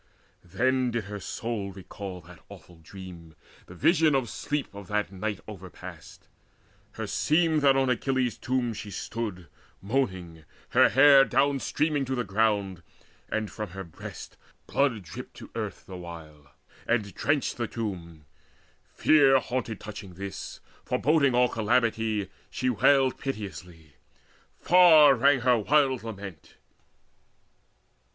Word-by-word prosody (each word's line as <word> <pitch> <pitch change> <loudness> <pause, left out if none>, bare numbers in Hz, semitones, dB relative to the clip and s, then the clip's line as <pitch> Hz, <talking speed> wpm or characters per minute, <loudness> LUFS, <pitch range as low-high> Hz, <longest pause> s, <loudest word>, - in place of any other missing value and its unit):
Then 125 +8 0
did 120 -2 -2
her 105 +1 -7
soul 105 -1 -4
recall 95 0 -8
that 85 +1 -15
awful 90 -3 -14
dream, 85 -2 -12 0.3
The 90 - -12
vision 160 - +3
of 130 -3 -1
sleep 145 -5 -3
of 100 -2 -10
that 105 +1 -1
night 100 +1 -4
overpast: 95 -4 -11 0.7
Herseemed 160 0 +1
that 135 -1 +5
on 135 0 +2
Achilles' 130 0 0
tomb 125 -2 -1
she 105 0 -7
stood 100 -2 -5 0.3
Moaning, 95 -8 -2 0.3
her - - +5
hair 135 +1 +7
down 135 +1 +1
streaming 150 +1 0
to 130 +1 -2
the 120 - -1
ground, 100 -3 0 0.5
And 110 -1 -2
from 105 -3 -6
her 95 - -4
breasts 85 -3 -10 0.3
blood 125 -8 0
dripped 80 - -10
to - - -12
earth - - -5
the 95 - -9
while, 80 -5 -11 0.4
And 110 -4 0
drenched 145 -1 0
the 120 -1 -2
tomb. 85 -10 -6 0.7
Fear 140 -3 +5
haunted 125 -4 -3
touching 105 -3 -9
this, 100 +1 -7 0.2
Foreboding 140 -4 +2
all 125 0 +4
calamity, 110 -3 0 0.2
she 130 0 -1
wailed 135 +2 +3
Piteously; 90 - -7 0.7
far 160 -5 +7
rang 135 +1 +3
her 125 -1 +3
wild 135 +2 +2
lament. 100 -7 -9
110 Hz, 130 wpm, -27 LUFS, 95-135 Hz, 0.7 s, hair